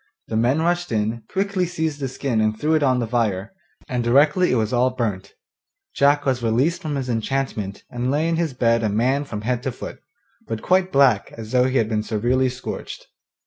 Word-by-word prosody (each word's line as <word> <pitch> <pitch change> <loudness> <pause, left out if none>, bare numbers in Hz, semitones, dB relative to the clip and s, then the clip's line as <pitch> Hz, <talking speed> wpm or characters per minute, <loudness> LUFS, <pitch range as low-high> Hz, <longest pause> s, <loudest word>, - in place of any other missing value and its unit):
The - - -2
men 125 +8 +2
rushed 175 -1 0
in, 110 +1 -1
quickly 195 -2 0
seized 160 -4 -2
the 135 - -2
skin 130 -3 -1
and 110 0 0
threw 155 +2 +1
it 155 - +3
on 130 -3 +3
the 120 - 0
fire, 110 - -1 0.3
and 125 -3 -1
directly 145 +9 +4
it - - +2
was 110 0 0
all 125 +1 +3
burnt 110 -7 -4 0.6
Jack 145 +1 +3
was 130 -3 +1
released 120 +9 +1
from 150 -2 -3
his 135 -2 -3
enchantment 115 -4 -2
and 125 +1 -3
lay 150 +4 +1
in 165 - +1
his 160 -6 -1
bed 115 -2 +2
a 110 - +1
man 130 +7 +1
from 105 -6 -5
head 120 +2 -1
to 130 0 -2
foot, - - -8 0.5
but 115 -1 -4
quite 185 0 +2
black 135 - +3
as 110 -1 -9
though 125 -1 +4
he 130 +1 +1
had 110 - +2
been 110 -1 0
severely 120 +5 +1
scorched. 125 +1 -7
125 Hz, 210 wpm, -22 LUFS, 115-145 Hz, 0.6 s, directly